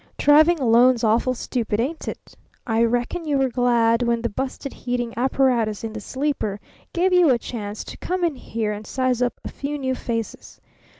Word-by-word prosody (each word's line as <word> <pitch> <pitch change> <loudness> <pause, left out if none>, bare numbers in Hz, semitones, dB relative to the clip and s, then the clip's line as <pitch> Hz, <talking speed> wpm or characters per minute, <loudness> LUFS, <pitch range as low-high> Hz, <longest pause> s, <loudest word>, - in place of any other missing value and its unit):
"Traveling 310 +3 +5
alone's 245 0 +4
awful 235 +3 +2
stupid, 230 -3 -2
ain't 295 +7 -2
it? - - -8 0.3
I 225 0 +2
reckon 245 +9 0
you 295 -3 0
were 270 -1 +2
glad 235 -1 +2
when 235 -1 0
the 235 - 0
busted 265 +4 -5
heating 245 -1 -3
apparatus 240 -4 +1
in 225 -1 -4
the 215 - -6
sleeper 260 -5 -2 0.3
gave 365 +2 +1
you 355 -3 +5
a 250 - +4
chance 210 -3 -6
to - - -9
come 365 0 -3
in 330 -4 +1
here 225 -4 -3
and 210 0 -6
size 255 -2 0
up 245 -1 0
a - - -3
few 290 +1 -4
new 260 -2 -1
faces. 230 -3 -5
245 Hz, 185 wpm, -23 LUFS, 230-275 Hz, 0.3 s, Traveling